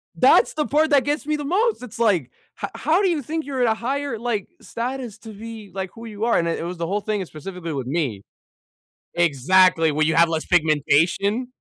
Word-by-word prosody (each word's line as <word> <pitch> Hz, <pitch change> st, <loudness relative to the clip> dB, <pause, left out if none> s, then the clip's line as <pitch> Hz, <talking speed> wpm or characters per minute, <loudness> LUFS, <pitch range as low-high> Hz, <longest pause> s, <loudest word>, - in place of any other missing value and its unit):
That's -, -, +5 dB
the 300 Hz, -1 st, -1 dB
part 310 Hz, +2 st, +2 dB
that 280 Hz, -2 st, +5 dB
gets 295 Hz, +1 st, -2 dB
me 305 Hz, 0 st, 0 dB
the 295 Hz, -1 st, -5 dB
most, 415 Hz, -, +1 dB
it's, 230 Hz, -2 st, -9 dB
like, 190 Hz, -, +2 dB, 0.3 s
"H -, -, -1 dB
how 330 Hz, +6 st, +2 dB
do 385 Hz, -, +3 dB
you 320 Hz, -4 st, 0 dB
think 315 Hz, +4 st, -4 dB
you're 270 Hz, -3 st, -3 dB
at 245 Hz, -, +3 dB
a -, -, 0 dB
higher, 265 Hz, +2 st, -3 dB
like, 225 Hz, -3 st, -2 dB
status 240 Hz, -2 st, -5 dB
to 220 Hz, +2 st, -11 dB
be, 220 Hz, -1 st, -9 dB
like, 190 Hz, -1 st, -4 dB
who 230 Hz, -1 st, -10 dB
you 215 Hz, -1 st, -4 dB
are," 235 Hz, -, +3 dB
and 170 Hz, -, +1 dB
it 165 Hz, -, -2 dB
was 180 Hz, +1 st, -5 dB
the 165 Hz, 0 st, -3 dB
whole 205 Hz, +2 st, -1 dB
thing 210 Hz, -1 st, -2 dB
is 185 Hz, -, -6 dB
specifically 170 Hz, 0 st, -7 dB
with 130 Hz, -3 st, -4 dB
me 130 Hz, -, -2 dB, 0.9 s
Exactly, 170 Hz, +1 st, +3 dB
where 155 Hz, +1 st, +1 dB
you 160 Hz, -, +1 dB
have 165 Hz, 0 st, +5 dB
less 160 Hz, -1 st, -2 dB
pigmentation 175 Hz, -, +2 dB
210 Hz, 220 wpm, -22 LUFS, 170-260 Hz, 0.9 s, That's